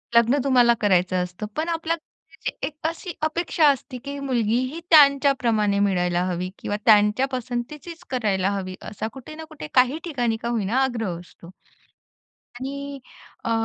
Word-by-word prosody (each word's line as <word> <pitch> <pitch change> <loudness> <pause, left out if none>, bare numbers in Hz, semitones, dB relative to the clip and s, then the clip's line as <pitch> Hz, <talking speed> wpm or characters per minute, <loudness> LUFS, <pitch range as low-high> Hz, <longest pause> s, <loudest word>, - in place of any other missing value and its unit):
लग्न 235 +4 +5
तुम्हाला 245 -3 +5
करायचं 185 -2 +2
असतं 180 +4 -6
पण 320 +2 -1
आपल्या 330 0 -1
घरच्यांची 325 - -10
एक 300 - -9
अशी 335 +2 -5
अपेक्षा 315 0 +2
असते, 270 -2 -2
की 280 +3 -7
मुलगी 240 -5 0 0.2
ही 330 - -5
त्यांच्याप्रमाणे 270 -9 +4
मिळायला 180 -3 +1
हवी 180 0 -2
किंवा 205 - -3
त्यांच्या 210 +3 +5
पसंतीचीच 260 +7 -5
करायला 205 -7 0
हवी, 185 -2 -4
असा 215 +1 -5
कुठे 270 +3 -10
ना 320 - -8
कुठे 310 - -8
काही 255 +5 +4
ठिकाणी 245 -9 -1
का 235 - -5
होईना 225 0 0
आग्रह 225 -9 -2
असतो. 175 -1 -15 1.1
आणि 280 +1 -5 0.5
अ, 230 - 0
245 Hz, 150 wpm, -24 LUFS, 205-280 Hz, 1.1 s, लग्न